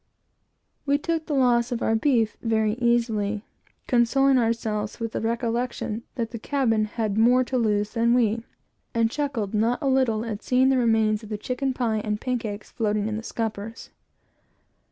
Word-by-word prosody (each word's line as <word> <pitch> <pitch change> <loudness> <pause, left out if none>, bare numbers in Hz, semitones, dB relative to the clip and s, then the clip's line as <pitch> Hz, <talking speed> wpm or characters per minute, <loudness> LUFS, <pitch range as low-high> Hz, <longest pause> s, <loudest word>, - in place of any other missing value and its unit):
We 285 0 +2
took 325 +1 -2
the 295 - -1
loss 245 -2 +3
of 240 - -2
our 225 - +2
beef 225 -3 +2
very 220 -2 +1
easily, 220 -3 +1 0.4
consoling 260 +2 +3
ourselves 225 -2 -1
with 230 -1 -3
the - - -3
recollection 235 -1 -2
that 230 -3 -3
the 230 - -6
cabin 225 -4 +1
had 215 -1 -2
more 250 +3 +5
to 255 - -4
lose 210 -4 +1
than 235 0 +2
we; 230 -2 +1 0.5
and 230 -1 +2
chuckled 270 -9 -2
not 225 +3 +2
a 290 - -5
little 250 -4 +2
at 215 -3 -4
seeing 260 +1 +3
the 265 -1 +3
remains 220 -2 +2
of 215 - -11
the 210 - -3
chicken 255 +5 -2
pie 225 -4 0
and 210 -1 -2
pan 250 0 -1
cakes 210 -2 -6
floating 210 -2 -1
in 215 - -2
the 220 - -3
scuppers. 225 -1 -5
230 Hz, 175 wpm, -25 LUFS, 215-250 Hz, 0.5 s, more